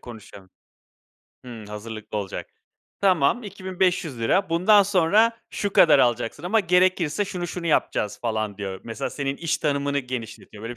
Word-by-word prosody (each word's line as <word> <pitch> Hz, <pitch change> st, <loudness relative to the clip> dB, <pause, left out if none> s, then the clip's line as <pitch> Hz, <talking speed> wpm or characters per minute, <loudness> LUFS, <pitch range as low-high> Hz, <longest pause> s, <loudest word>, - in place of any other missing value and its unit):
konuşalım. 100 Hz, -5 st, -12 dB, 0.9 s
Hımm, 115 Hz, -4 st, -9 dB
hazırlıklı 110 Hz, 0 st, -6 dB
olacak. 100 Hz, -2 st, -5 dB, 0.5 s
"Tamam 190 Hz, -, +2 dB
₺2.500 185 Hz, -, -1 dB
bundan 195 Hz, +5 st, +5 dB
sonra 205 Hz, +5 st, +3 dB
şu 205 Hz, -1 st, -3 dB
kadar 155 Hz, -7 st, +6 dB
alacaksın 120 Hz, +3 st, 0 dB
ama 215 Hz, +5 st, +2 dB
gerekirse 180 Hz, -1 st, +2 dB
şunu 180 Hz, -3 st, -5 dB
şunu 170 Hz, 0 st, -5 dB
yapacağız." 105 Hz, -8 st, 0 dB
falan 110 Hz, -3 st, -3 dB
diyor. 95 Hz, -2 st, -5 dB
Mesela, 115 Hz, +4 st, -4 dB
senin 140 Hz, -1 st, -3 dB
iş 165 Hz, 0 st, -1 dB
tanımını 140 Hz, -1 st, 0 dB
genişletiyor, 115 Hz, -4 st, -7 dB
böyle 120 Hz, +1 st, -6 dB
145 Hz, 135 wpm, -24 LUFS, 115-185 Hz, 0.9 s, kadar